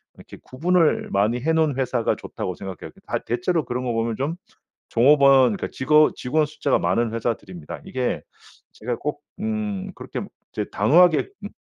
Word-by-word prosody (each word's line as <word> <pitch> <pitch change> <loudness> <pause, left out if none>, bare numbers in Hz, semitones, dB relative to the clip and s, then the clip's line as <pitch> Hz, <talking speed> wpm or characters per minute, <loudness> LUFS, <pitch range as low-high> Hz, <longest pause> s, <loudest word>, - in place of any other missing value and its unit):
이렇게 - - -13
구분을 165 +4 +1
많이 105 +5 +1
해 160 +5 +1
놓은 155 -4 +2
회사가 125 -3 0
좋다고 90 - -5
생각해요. 95 -4 -8 0.2
다 - - 0
대체로 165 +6 0
그런 125 +1 -3
거 120 - -1
보면 115 0 -1
좀 145 +5 -2 0.5
종업원 135 -3 +5
그니까 - - -4
직원 150 +3 +4
직원 150 +4 +1
숫자가 145 -2 0
많은 115 -1 +1
회사들입니다. 95 -8 -4
이게 130 -1 -2 0.5
제가 120 +1 -4
꼭 150 0 -4 0.2
음 210 -3 -3
그렇게 - - -6 0.3
이제 - - -2
단호하게 175 - +4
읍 - - -7
130 Hz, 350 characters per minute, -23 LUFS, 115-160 Hz, 0.5 s, 종업원